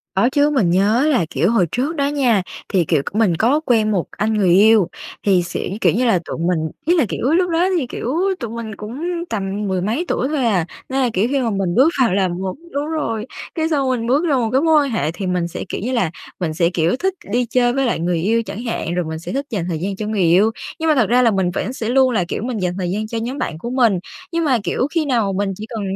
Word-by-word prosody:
Có 215 +6 +3
chứ, 290 +2 +3
mình 255 -12 +2
nhớ 210 - +3
là, 185 - +2
kiểu, 180 +5 +1
hồi 190 -7 +3
trước 280 +7 -1
đó 280 -1 +1
nha, 260 -8 +2 0.3
thì, 185 -4 +2
kiểu, 155 -3 +2
c - - -7
mình 215 -6 +3
có 265 +7 +3
quen 220 -4 +2
một 185 -5 0
anh 220 +1 -1
người 200 -4 +2
yêu 210 -2 +5 0.4
thì 185 -3 +3
sẽ 175 - -4
kiểu - - +4
như 250 +2 +1
là, 210 -6 +3
tụi - - -5
mình 165 -2 -1
ý 345 +3 +3
là, 295 - +3
kiểu, - - -4
lúc 360 +1 +2
đó 340 +3 +2
thì, 260 -6 -1
kiểu, 250 +4 -3 0.2
tụi 235 -3 -4
mình 225 -2 -6
cũng 225 +9 -7 0.3
tầm 200 -1 -3
mười 185 -1 -1
mấy 235 - -1
tuổi 260 - 0
thôi 285 -5 0
à, 185 -7 +2 0.2
nên 265 +1 0
là, 250 - +2
kiểu, 200 +5 +2
khi 275 0 +1
mà 235 - 0
mình 195 -4 -1
bước 270 +7 +5
vào 230 -7 +3
là 190 -1 +2
một 185 +2 -4 0.2
đúng 285 +2 -2
rồi, 230 -9 -2 0.3
cái 320 -1 0
xong 275 -4 +1
mình 235 -3 -1
bước 280 +7 +2
ra 300 -5 +2
một 235 -4 +1
cái 265 +2 +3
mối 320 -2 +4
quan 275 - -2
hệ 165 -9 0
thì 190 +2 -5
mình 180 -2 0
sẽ, 170 - -6
kiểu - - -4
như 245 - -2
là, 210 -11 0 0.3
mình 165 -3 -2
sẽ, 170 +1 +2
kiểu, 175 +3 +1
thích 380 +1 0 0.2
đi 245 +1 +1
chơi 245 +1 +2
với 270 0 +1
lại 235 - 0
người 170 0 0
yêu 225 +4 +1
chẳng 200 +4 -7
hạn, 200 -7 -3
rồi 180 -2 -1
mình 160 0 -5
sẽ 170 - -7
thích 275 +1 -2
dành 190 -7 -2
thời 165 -3 -2
gian 195 +3 -3
cho 210 +1 -4
người 210 -3 -1
yêu, 185 +6 +4 0.3
nhưng 320 0 0
mà 305 - +4
thật 225 -7 +2
ra 250 +1 +4
là 230 -2 +4
mình 190 -3 0
vẫn 250 - -3
sẽ 225 -3 -4
luôn 260 0 +4
là, 190 -6 +1
kiểu, 210 - -3
mình 245 -2 -3
dành 180 -1 0
thời 180 -2 -2
gian 215 +3 -2
cho 230 +1 -4
nhóm 245 +5 -3
bạn 155 - -3
của 210 +9 -6
mình. 235 -7 +2 0.3
Nhưng 335 -1 0
mà, 260 -4 +3
kiểu, 255 - 0
khi 330 -3 0
nào 230 -7 +1
mình 195 0 -1
chỉ 215 - -7
cần, 225 -2 -4
225 Hz, 280 wpm, -19 LUFS, 185-260 Hz, 0.4 s, yêu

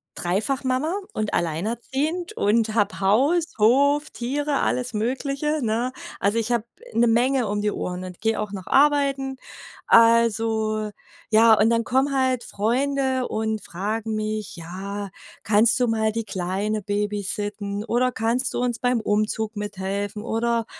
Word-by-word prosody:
dreifach 205 +10 -1
Mama 260 +6 0 0.2
und 215 -1 -2
alleinerziehend 240 - -2
und 220 - +1
habe 205 -3 +1
Haus, 270 - +3
Hof, 280 +7 +3
Tiere, 285 +4 -2
alles 250 -1 -1
Mögliche, 275 +7 -1
ne? 235 +3 -1 0.3
Also 205 +3 +1
ich 230 +1 -2
habe 235 -2 +1 0.3
'ne 240 +1 +3
Menge 245 +2 +2
um 205 +1 -1
die 210 0 +1
Ohren 180 -1 -4
und 180 -1 -9
geh 225 0 +1
auch 210 -1 -3
noch 190 -3 -7
arbeiten. 275 -2 +2 0.5
Also, 225 -2 +3 0.4
ja, 225 +1 +7
und 215 +1 +4
dann 230 0 +2
kommen 265 +4 +1
halt 260 -2 +1
Freunde 260 +4 0
und 220 0 -2
fragen 215 +5 -3
mich: 215 -1 -3
„Ja, 195 +4 -6 0.3
kannst 220 +4 +3
du 250 - +2
mal 220 -1 +1
die 230 0 -3
Kleine 195 +3 -2
Babysitten“ 205 0 -3
oder 245 +2 +1
„kannst 240 +3 -1
du - - -2
uns 245 -2 0
beim 245 -1 +1
Umzug 215 +1 -1
mithelfen“ 205 0 -4
oder 230 0 0
225 Hz, 145 wpm, -23 LUFS, 210-255 Hz, 0.5 s, ja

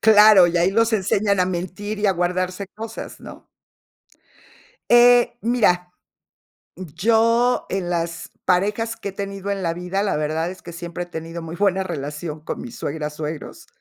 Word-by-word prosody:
Claro, 210 -4 +7
y 175 - -1
ahí 175 +2 +3
los 230 +2 +2
enseñan 200 -1 +1
a 180 - +3
mentir 185 +4 -4
y 210 - +1
a 195 - +4
guardarse 180 +2 -2
cosas, 225 +2 -8
¿no? - - -12 1.4
Eh, 240 0 +6
mira. 210 -7 +2 0.9
Yo, 230 +7 +2
en 185 -2 -2
las 170 -1 -3 0.2
parejas 205 +5 +1
que 200 - -5
he - - -17
tenido 200 0 -5
en 195 -1 -2
la 165 -1 -1
vida, 180 +3 -2
la 205 - 0
verdad 155 +3 -1
es 185 0 -11
que 170 - -9
siempre 170 +1 -6
he - - -18
tenido 165 0 -7
muy 165 0 -7
buena 190 0 +1
relación 150 -2 -5
con 155 - -6
mis 240 -1 -9
suegras, 150 -6 -4
suegros. 155 0 -6
185 Hz, 165 wpm, -22 LUFS, 170-210 Hz, 1.4 s, Claro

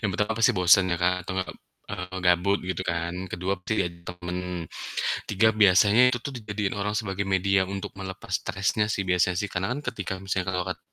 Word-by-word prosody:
Yang 105 - +1
pertama 105 +2 +1
pasti 115 +2 +5
bosen 90 +1 +6
ya 85 - +1
Kak, 90 +1 +4
atau 95 - -4
nggak, 95 - -1 0.4
eee, 90 -2 -5
gabut 90 +3 +3
gitu 95 0 -2
kan. 85 0 -2 0.2
Kedua 90 +2 -2
bisa 110 - -2
jadi 85 0 -6
teman. 90 0 -5 0.9
Tiga, 105 +2 +4
biasanya 100 +3 +6
itu 125 - 0
tuh 140 - -4
dijadiin 105 -2 -3
orang 105 +1 -1
sebagai 100 -2 -3
media 95 +1 +3
untuk 100 +1 -5
melepas 95 -1 -7
stresnya 100 +2 0
sih 95 - -1
biasanya 90 0 +2
sih, 105 - -2
karena 95 +1 -1
kan 135 - -4
ketika 105 -6 -3
misalnya 95 -1 -1
Kakak 90 -1 -1
kat - - -4
95 Hz, 200 wpm, -26 LUFS, 90-105 Hz, 0.9 s, bosen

